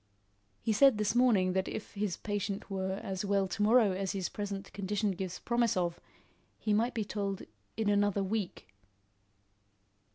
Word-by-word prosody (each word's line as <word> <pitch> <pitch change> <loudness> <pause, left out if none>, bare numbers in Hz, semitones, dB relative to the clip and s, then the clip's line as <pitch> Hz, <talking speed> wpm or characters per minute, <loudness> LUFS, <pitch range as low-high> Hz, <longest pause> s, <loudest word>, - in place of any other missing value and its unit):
"He 220 - +2
said 270 +1 +6
this 210 0 +1
morning 220 -7 +4
that 190 0 0
if 220 - -6
his 200 -4 -2
patient 205 -1 -3
were 190 -1 -1
as 190 0 -3
well 200 -1 +2
to 185 - -4
morrow 220 -1 +5
as 190 0 -2
his 190 -3 -2
present 200 -1 -5
condition 205 +1 -1
gives 185 -1 -4
promise 235 -3 +1
of, 175 -1 0 0.6
he 215 - 0
might 230 +4 +1
be 220 -2 -1
told 200 -2 -3 0.3
in 220 -2 0
another 205 -1 +2
week." 195 - -3
200 Hz, 160 wpm, -32 LUFS, 190-215 Hz, 0.6 s, said